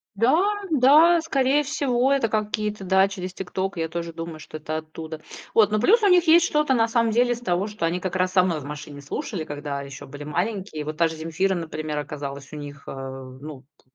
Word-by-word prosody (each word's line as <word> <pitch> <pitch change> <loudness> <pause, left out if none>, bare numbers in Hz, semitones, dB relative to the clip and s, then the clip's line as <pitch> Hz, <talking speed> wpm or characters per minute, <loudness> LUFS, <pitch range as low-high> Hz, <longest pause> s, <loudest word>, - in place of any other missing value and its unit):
Да, 235 +9 +4 0.3
да, 315 +5 +6
скорее 275 -2 +2
всего, 270 -3 +1
это 270 -5 +2
какие-то, 210 -1 -2
да, 190 +1 +4
через 185 -2 -5
TikTok, 190 +1 -3
я 165 -1 -1
тоже 170 0 -5
думаю, 165 -1 -7
что 155 - -8
это 155 +1 -4
оттуда, 160 0 -8 0.3
вот. 215 -2 +5
Но 215 - +2
плюс 435 - +5
у - - +4
них 360 -1 +5
есть 335 +1 +7
что-то 300 -4 +2
на 225 -1 +3
самом 230 -1 +1
деле 245 +1 +3
из 240 - -4
того, 185 -4 0
что 210 -6 -3
они 175 +2 0
как 185 0 -4
раз 185 0 +1
со 185 -1 +5
мной 170 -4 0
в - - -10
машине 145 0 -8
слушали, 170 - -4
когда 145 -2 -5
еще 140 -1 -9
были 145 +2 -9
маленькие. 175 -1 -3
Вот 155 +1 -6
та 165 -1 +4
же 160 - -7
"Земфира", 165 +5 0
например, 155 -3 -4
оказалась 140 -1 -6
у - - -6
них, 145 -1 -8
а, 135 0 -6 0.2
ну, 145 -2 -9 0.2
в 130 - -39
185 Hz, 220 wpm, -24 LUFS, 155-230 Hz, 0.3 s, есть